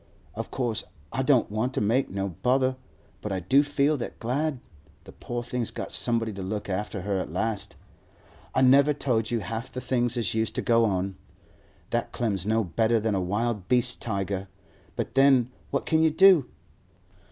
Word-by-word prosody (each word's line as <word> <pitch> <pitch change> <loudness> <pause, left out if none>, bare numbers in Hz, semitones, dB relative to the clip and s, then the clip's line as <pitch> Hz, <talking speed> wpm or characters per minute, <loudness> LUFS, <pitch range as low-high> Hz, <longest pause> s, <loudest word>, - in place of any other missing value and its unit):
Of - - -5
course 120 -4 -2 0.3
I 130 - 0
don't 130 -5 +3
want 125 +5 -1
to - - +1
make 115 +6 +1
no 100 0 -2
bother, 130 - +1 0.5
but 105 - -4
I 95 - -1
do 130 +10 +4
feel 145 +1 +1
that 120 - -6
glad 140 +4 -1 0.4
the - - -12
poor 120 0 -5
thing's 120 -1 -3
got - - -6
somebody 115 -2 0
to 100 - -7
look 105 +2 -4
after 100 +1 -3
her 100 -1 -1
at - - -5
last. 110 -3 -2 0.8
I 130 - +4
never 140 +3 +5
told 115 -6 0
you 115 -2 -1
half 110 +5 -5
the 125 - -5
things 120 -1 0
as 115 -6 -1
used 110 0 -1
to - - -1
go 115 -1 +4
on. 95 -2 -1 0.7
That - - -1
Clem's 100 -5 -1
no 110 +1 +2
better 110 +6 +1
than 110 0 -1
a 95 - 0
wild 105 +1 -2
beast 125 -2 +2
tiger; 100 -3 -2 0.5
but - - -3
then 135 -2 +4 0.2
what 140 - -1
can 160 0 +2
you 160 - +5
do? 175 -4 +6
115 Hz, 185 wpm, -26 LUFS, 105-130 Hz, 0.8 s, do